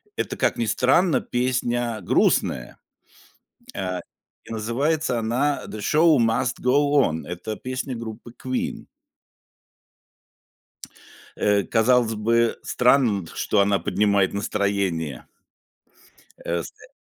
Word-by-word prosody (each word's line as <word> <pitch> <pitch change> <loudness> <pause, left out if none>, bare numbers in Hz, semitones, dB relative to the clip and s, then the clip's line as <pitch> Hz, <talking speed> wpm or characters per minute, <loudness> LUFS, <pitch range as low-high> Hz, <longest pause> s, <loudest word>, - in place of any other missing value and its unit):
это, - - -3
как - - +1
ни 115 - 0
странно, 135 - +2
песня 120 -2 -1
грустная. 60 -7 +1 1.0
Э, 90 -1 -3 0.4
и - - -14
называется 125 +5 -1
она 125 +6 0
"The 110 - -7
Show 155 +7 +4
must 115 +2 0
go 140 +3 +2
on". 80 -4 -2
Это 90 +5 -5
песня 130 +2 -4
группы 115 +1 -8
Queen. 130 -1 -3 2.5
Э, 105 -1 +2
казалось 115 +3 +2
бы 115 +2 +1
странным, 120 -7 +2
что 105 - +1
она 100 0 +3
поднимает 100 -2 +1
настроение. 100 -9 -2 1.1
Э, 85 0 -2
с, - - -9
э - - -19
115 Hz, 105 wpm, -23 LUFS, 100-125 Hz, 2.5 s, Show